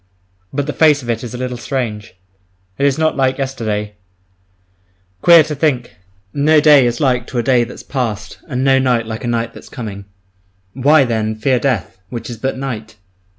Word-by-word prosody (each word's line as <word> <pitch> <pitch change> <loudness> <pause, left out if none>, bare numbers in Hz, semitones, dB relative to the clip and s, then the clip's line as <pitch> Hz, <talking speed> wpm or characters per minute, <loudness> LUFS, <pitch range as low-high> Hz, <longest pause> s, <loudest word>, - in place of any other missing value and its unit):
But 140 0 -2
the 150 - -3
face 150 -3 +4
of 120 - -2
it 115 +1 -3
is 120 0 -6
a - - -5
little 125 0 -4
strange, 115 -7 -4 0.6
it 140 - +3
is 135 - +1
not 160 0 +1
like 130 -1 +1
yesterday. 110 -6 -3 1.3
Queer 170 -2 +8
to 155 0 -5
think, 130 - -1 0.4
no 150 +2 +4
day 145 -4 +6
is 120 0 -2
like 125 -3 +1
to 125 - -5
a 120 - +1
day 125 0 +3
that's 120 - -9
past 105 -6 -4
and 125 -1 -2
no 135 -1 +4
night 125 -3 +1
like 110 +1 -6
a - - -3
night 115 -1 -1
that's - - -13
coming! 100 -4 -7 0.7
Why, 140 +3 +4
then, 110 -2 -1
fear 125 +4 +1
death, 110 -8 -2
which 120 0 -6
is 115 - -7
but 130 +3 -3
night? 120 -6 -5
125 Hz, 190 wpm, -17 LUFS, 115-135 Hz, 1.3 s, Queer